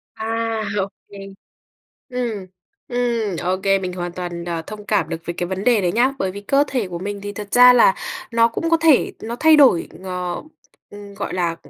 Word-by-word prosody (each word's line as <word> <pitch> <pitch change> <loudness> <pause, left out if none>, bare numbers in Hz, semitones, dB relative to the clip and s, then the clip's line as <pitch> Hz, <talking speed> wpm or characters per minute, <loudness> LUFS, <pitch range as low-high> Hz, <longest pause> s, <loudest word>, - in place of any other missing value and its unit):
À, 225 0 -2
ô 195 -1 0 0.2
kê. 200 - -10 0.9
Ừm, 235 -6 -3 0.4
ừm, 235 -6 -1
ô 185 +1 0
kê. 195 0 +3
Mình 185 -1 -4
hoàn 175 -1 -5
toàn, 175 -1 -5
à, 165 -1 -3
thông 210 +4 -9
cảm 200 -8 +1
được 165 - -3
với 170 - -3
cái 175 - -3
vấn 190 +3 -4
đề 240 -4 +4
đấy 175 -2 0
nhá, 245 +4 +3
bởi 190 - -1
vì 200 +2 -8
cơ 275 +8 +2
thể 245 -8 -2
của 175 -1 -5
mình 200 +2 -5
thì 205 0 -5
thật 205 -1 -7
ra 250 0 +9
là 235 -6 +5 0.4
nó 230 0 +4
cũng 330 +8 -3
có 330 - +5
thể 320 -4 +3
nó 230 +2 -5
thay 315 0 +6
đổi 265 - +5
ng 185 - -14 0.9
ừm, 205 0 -11
gọi 200 - -5
là, 170 -2 -1
205 Hz, 210 wpm, -20 LUFS, 185-235 Hz, 0.9 s, ra